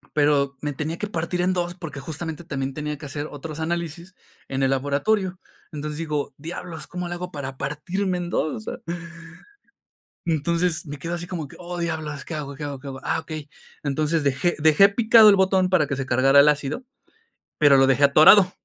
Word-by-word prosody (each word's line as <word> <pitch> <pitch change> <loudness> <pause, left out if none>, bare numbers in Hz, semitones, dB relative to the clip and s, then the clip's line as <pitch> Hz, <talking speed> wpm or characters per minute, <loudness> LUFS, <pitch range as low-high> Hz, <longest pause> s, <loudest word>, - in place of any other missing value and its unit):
pero 145 -2 +2
me 150 - -2
tenía 150 +4 -4
que 210 - -3
partir 175 -2 -2
en 180 +1 +2
2 175 -1 -2
porque, 165 -5 -7
justamente, 160 +3 -6
también 135 -4 -3
tenía 150 +1 -4
que 145 - -10
hacer 145 +1 -5
otros 150 +2 -8
análisis 170 +2 -4 0.3
en 135 0 -2
el 135 - +3
laboratorio. 180 +8 0 0.3
Entonces, 150 0 -5
digo: 150 -3 -3
"Diablos, 165 +1 -7
¿cómo 180 0 -5
le 175 - -3
hago 180 +1 -6
para 135 -2 -6
partirme 180 +7 -2
en 175 -1 -4
2?", 155 -3 0
o - - -6
sea - - -6 1.5
Entonces, 170 +1 0
me 145 0 -6
quedo 165 +5 -5
así 175 0 -4
como 170 -5 -5
que: - - -15
"Oh, 175 0 -6
diablos, 155 -4 -4
¿qué - - -7
hago, 145 -2 -5
qué 150 - -8
hago, 140 -2 -5
qué 140 - -11
hago? 135 -1 -6
Ah, - - 0
okey". 155 -2 -7 0.4
Entonces, 150 +2 0
dejé 140 +5 +1
dejé 155 +6 +6
picado 220 +1 +7
el 200 - +7
botón 190 -1 +3
para 180 -5 +3
que 140 - -2
se 135 -1 -4
cargara 135 +3 +5
el 140 - +7
ácido, 150 - -1 0.7
pero 145 -2 +6
lo 135 0 +5
dejé 135 +1 +3
atorado. 175 +7 +7
155 Hz, 200 wpm, -23 LUFS, 145-175 Hz, 1.5 s, picado